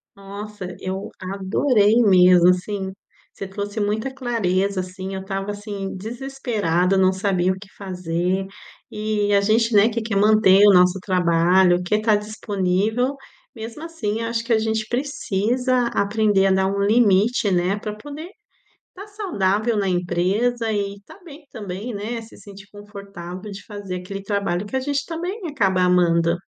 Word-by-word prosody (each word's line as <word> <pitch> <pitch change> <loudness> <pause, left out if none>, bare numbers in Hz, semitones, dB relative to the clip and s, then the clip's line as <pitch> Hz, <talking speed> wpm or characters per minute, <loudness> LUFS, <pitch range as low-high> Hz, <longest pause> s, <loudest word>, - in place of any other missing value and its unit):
Nossa, 200 0 -8
eu 190 +1 -5
adorei 205 +4 +2
mesmo, 180 -4 +6
assim. 190 +1 -1 0.4
Você 195 - -7
trouxe 205 +2 -4
muita 215 +5 -1
clareza, 200 -7 -1
assim, 185 +1 -6
eu 190 - -4
estava, 195 +1 -4
assim, 205 -1 -6
desesperada. 215 -6 -1
Não 190 0 +4
sabia 190 -1 0
o 190 - -4
que 210 - -13
fazer. 180 0 -2 0.4
E 210 -1 -1
a 200 - +4
gente, 225 +2 +2
né, 210 +2 +5
que 230 0 -3
quer 220 -2 -3
manter 205 -1 +5
o 200 - +7
nosso 180 +1 +4
trabalho, 180 0 +3
quer 210 +4 0
tá 215 -1 +3
disponível. 210 +4 -1 0.4
Mesmo 230 +7 -8
assim, 230 -10 -3
acho 230 0 -2
que 235 - +1
a 220 - +3
gente 220 0 -1
precisa 250 -2 0
aprender 205 -2 +1
a - - +2
dar 190 0 +2
um 200 +1 -2
limite, 210 0 +3
né, 180 +2 +1
pra 210 0 -5
poder 295 +8 -9 0.6
tá 400 +3 -10
saudável 225 - -1
na 200 -2 0
empresa 190 +7 0
e 200 -1 -3
tá - - -15
bem 300 -2 -13
também, 205 +3 -6
né? 225 +3 -4
Se 225 - -15
sentir 200 0 -13
confortável 200 -2 -9
de 200 0 -9
fazer 205 -3 -7
aquele 195 +2 -7
trabalho 200 -2 -1
que 205 - -6
a 265 - +2
gente 285 0 -2
também 350 +6 -5
acaba 195 -10 +1
amando. 170 -2 +3
205 Hz, 155 wpm, -22 LUFS, 190-225 Hz, 0.6 s, o